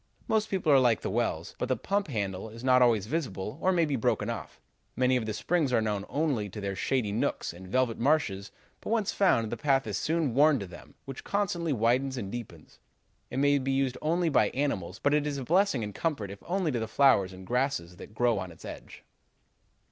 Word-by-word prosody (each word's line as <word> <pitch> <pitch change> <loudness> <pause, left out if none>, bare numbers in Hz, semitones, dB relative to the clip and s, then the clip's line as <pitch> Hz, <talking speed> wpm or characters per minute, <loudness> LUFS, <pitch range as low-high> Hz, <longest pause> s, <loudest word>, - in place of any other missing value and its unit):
Most 220 0 +1
people 180 -5 +1
are 140 - +7
like 120 -3 +3
the - - -3
wells, 110 -8 -1
but 125 - -2
the 130 - +2
pump 200 +1 -1
handle 100 -5 -3
is 115 +2 -11
not 130 -1 +5
always 115 -5 +4
visible 120 - -4
or 190 - +3
may 170 -3 +3
be 145 -2 -1
broken 115 - 0
off. - - -7 0.4
Many 130 0 +2
of 115 -3 -1
the 110 - -2
springs 160 -3 0
are 125 - +3
known 105 -2 -1
only 140 -9 -1
to 105 - -8
their 100 -1 -3
shady 120 -1 0
nooks 105 -5 -1
and 90 +2 -11
velvet 125 +2 0
marshes, 115 -8 +1 0.3
but, - - -8
once 220 -3 +1
found, 115 - +2
the 120 - -3
path 135 +1 +2
is - - -2
soon 160 -5 0
worn 145 +3 +5
to 100 - -5
them, 90 -1 -13
which 135 -1 -8
constantly 175 -5 -1
widens 130 +2 +1
and 100 -5 -5
deepens. 120 -2 -9 0.5
It 125 - -5
may 145 +1 +3
be 135 0 -1
used 135 -2 0
only 170 +2 +1
by 145 - +3
animals, 105 -10 -2
but 145 +4 +1
it 150 0 +2
is 145 -1 -2
a 135 - -4
blessing 175 - +2
and 105 -1 -5
comfort 115 - -2
if 100 - -10
only 180 -3 0
to 120 - -1
the 110 - -3
flowers 110 -6 +4
and 95 0 -11
grasses 125 -8 -1
that 105 - -12
grow 120 -2 +2
on 95 -1 -6
its 80 - -14
edge.' - - -10
125 Hz, 225 wpm, -29 LUFS, 105-150 Hz, 0.5 s, are